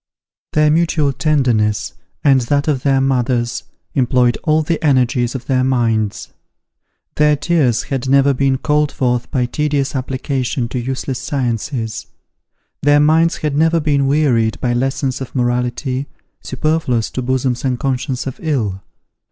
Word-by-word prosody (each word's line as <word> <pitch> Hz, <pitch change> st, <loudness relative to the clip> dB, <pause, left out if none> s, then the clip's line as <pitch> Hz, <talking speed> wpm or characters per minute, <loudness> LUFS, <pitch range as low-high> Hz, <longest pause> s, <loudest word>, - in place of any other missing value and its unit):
Their 150 Hz, 0 st, +4 dB
mutual 155 Hz, -3 st, +1 dB
tenderness, 125 Hz, -7 st, +1 dB, 0.3 s
and 135 Hz, -3 st, +4 dB
that 140 Hz, +5 st, 0 dB
of 140 Hz, -4 st, 0 dB
their 135 Hz, -1 st, +2 dB
mothers, 125 Hz, -3 st, 0 dB, 0.3 s
employed 125 Hz, -2 st, +2 dB
all 155 Hz, -1 st, +2 dB
the 165 Hz, +1 st, -2 dB
energies 125 Hz, -3 st, +2 dB
of 130 Hz, -, -5 dB
their 130 Hz, -1 st, +1 dB
minds. 115 Hz, -5 st, 0 dB, 0.9 s
Their 150 Hz, 0 st, +4 dB
tears 145 Hz, -6 st, +1 dB
had 135 Hz, -1 st, -3 dB
never 140 Hz, +1 st, +4 dB
been 135 Hz, 0 st, +1 dB
called 150 Hz, +1 st, +1 dB
forth 125 Hz, -2 st, -1 dB
by 130 Hz, -4 st, 0 dB
tedious 145 Hz, +1 st, -1 dB
application 130 Hz, -1 st, -2 dB
to 125 Hz, -, -3 dB
useless 130 Hz, +1 st, -3 dB
sciences. 120 Hz, -3 st, -3 dB, 0.7 s
Their 145 Hz, 0 st, +4 dB
minds 160 Hz, +2 st, +3 dB
had 150 Hz, -2 st, -1 dB
never 165 Hz, +2 st, +3 dB
been 145 Hz, -3 st, +1 dB
wearied 130 Hz, -7 st, +1 dB
by 125 Hz, -2 st, 0 dB
lessons 135 Hz, +1 st, -1 dB
of 130 Hz, -, -7 dB
morality, 125 Hz, +2 st, -1 dB, 0.3 s
superfluous 130 Hz, -4 st, -1 dB
to 130 Hz, -, -3 dB
bosoms 130 Hz, 0 st, -1 dB
unconscious 130 Hz, 0 st, -2 dB
of 135 Hz, -, -6 dB
ill. 115 Hz, -, -1 dB
135 Hz, 135 wpm, -17 LUFS, 125-145 Hz, 0.9 s, Their